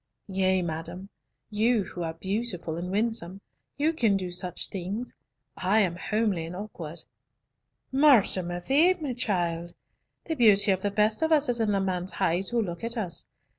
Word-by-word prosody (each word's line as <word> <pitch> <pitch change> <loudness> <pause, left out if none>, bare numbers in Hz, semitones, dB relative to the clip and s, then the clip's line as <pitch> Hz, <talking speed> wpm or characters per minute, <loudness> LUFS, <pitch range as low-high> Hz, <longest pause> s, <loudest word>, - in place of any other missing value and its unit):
"Yea, 190 -1 +2
madam, 170 +3 -5 0.4
you 220 +1 +2
who 175 - -8
are 165 -1 -3
beautiful 190 -3 -3
and 175 +2 -4
winsome, 205 -2 -1 0.4
you 305 +3 +1
can 225 -10 +2
do 185 -2 -4
such 180 0 -2
things, 200 +6 -5 0.4
I 200 +4 +2
am 180 -4 0
homely 200 -3 -1
and 175 - -7
awkward." 175 -5 -6 0.9
"Mort 270 -5 +6
de 185 - -1
ma 175 0 -5
vie, 315 - +4 0.2
child! 175 -7 -2 0.5
the 325 - -2
beauty 210 -5 +5
of 190 -1 0
the 205 - 0
best 210 +4 +2
of 320 0 +1
us 300 -3 +5
is 240 -1 +3
in 215 -2 +1
the 200 - +2
man's 185 -1 -2
eyes 185 0 +2
who 235 -1 +1
looks 175 -1 -6
at 230 +1 -3
us. 185 -7 -3
195 Hz, 170 wpm, -27 LUFS, 175-230 Hz, 0.9 s, Mort